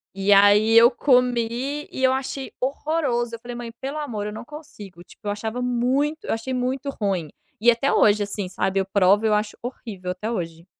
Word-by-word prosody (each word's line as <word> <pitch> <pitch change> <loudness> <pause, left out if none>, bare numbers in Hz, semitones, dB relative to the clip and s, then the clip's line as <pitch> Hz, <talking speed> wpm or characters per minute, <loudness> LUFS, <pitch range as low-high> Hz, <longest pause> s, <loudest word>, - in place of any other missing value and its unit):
E 195 +1 0
aí 205 +3 +6
eu 235 +1 +8
comi 250 +2 +1
e 265 - -5
eu 260 - +4
achei 265 0 -4
horroroso, 260 -4 -1
eu 230 - -11
falei: 240 +1 -8
"Mãe, 240 -1 -7
pelo 275 +3 -4
amor, 225 -9 -4
eu 210 - -5
não 215 - -8
consigo". 215 - -11
Tipo, 210 - -14
eu 205 - +1
achava 220 +4 -4
muito 255 +5 0
eu - - -1
achei 230 +4 -4
muito 255 +3 -2
ruim 195 - -2 0.3
e 235 - +5
até 240 +4 0
hoje, 205 0 +4
assim, 200 -2 -4
sabe, 195 +1 -1
eu 190 - 0
provo, 200 +2 +4
eu 215 - +3
acho 210 0 -1
horrível, 210 -7 -6
até 200 +5 -5
hoje. 170 -6 -5
230 Hz, 200 wpm, -23 LUFS, 205-260 Hz, 0.3 s, eu